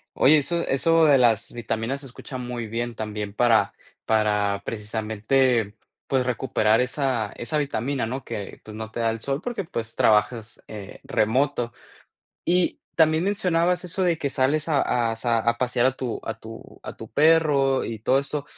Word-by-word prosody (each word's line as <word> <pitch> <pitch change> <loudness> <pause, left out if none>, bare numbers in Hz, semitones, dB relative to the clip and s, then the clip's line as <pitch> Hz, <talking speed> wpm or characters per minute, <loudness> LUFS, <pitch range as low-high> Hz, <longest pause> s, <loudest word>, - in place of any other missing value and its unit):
Oye, 150 +4 +6
eso 170 +4 -1
eso 165 +4 +3
de 145 -2 +6
las 120 -5 +2
vitaminas 115 +3 -3
se 140 - -10
escucha 130 +1 -9
muy 120 -2 -4
bien, 120 +2 -3
también 105 -2 -5
para 115 +1 +3 0.3
para 105 -2 +1
precisamente, 110 +1 0 0.3
pues, 130 -2 +1
recuperar 120 -2 +2
esa 125 -5 -1
esa 120 +5 -4
vitamina, 140 -2 -1
¿no?, 130 +4 -4
que, 105 -4 -7
pues, 110 0 -10
no 110 0 -6
te 115 - -5
da 115 - +2
el 115 - -4
sol, 135 +4 -2
porque 235 -1 -4
pues, 115 -9 -6
trabajas, 110 +1 +1
eh, 100 -2 -9
remoto. 120 +2 0 0.7
Y 180 0 +1 0.2
también, 160 +1 +3
mencionabas 180 -3 +1
eso 180 +2 -2
de 175 -3 +2
que 145 - -1
sales 140 +4 0
a 125 -6 +1
a - - -5
sa 115 0 +1
a 115 +1 +1
pasear 125 0 +1
a 130 - +3
tu 125 -3 -4
a 110 0 -5
tu 115 0 -11
a - - -7
tu 110 - -11
perro, 145 -1 +3
y 115 -1 -4
todo 130 +5 +3
eso. 140 +1 -3
125 Hz, 175 wpm, -24 LUFS, 110-145 Hz, 0.7 s, Oye